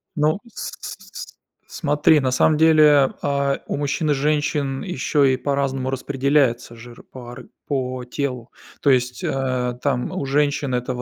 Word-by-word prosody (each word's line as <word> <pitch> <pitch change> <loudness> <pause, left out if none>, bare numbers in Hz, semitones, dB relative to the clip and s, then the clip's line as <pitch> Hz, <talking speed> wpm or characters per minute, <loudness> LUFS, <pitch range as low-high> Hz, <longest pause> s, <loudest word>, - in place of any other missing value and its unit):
Ну, 155 +5 +1
с 235 - -7
с - - -6
с - - -9
с - - -36 0.3
смотри, 150 0 +2
на 130 -2 0
самом 150 +4 +3
деле, 150 -3 +5
а, 140 -1 0
у - - -3
мужчин 145 +2 -1
и - - +4
женщин 145 -1 0
ещё 150 -4 0
и 130 -1 +3
по-разному 135 -1 -1
распределяется 135 -2 0
жир 120 +1 -13
по 120 -2 -9
ар 125 0 -10 0.2
по 130 -3 -2
телу. 125 -1 -4 0.3
То 140 - +2
есть, 125 -1 +1
а, 130 -2 -1
там 130 -4 -1
у - - -3
женщин 145 -1 0
это 125 0 -2
в 125 - -5
135 Hz, 170 wpm, -21 LUFS, 125-145 Hz, 0.3 s, деле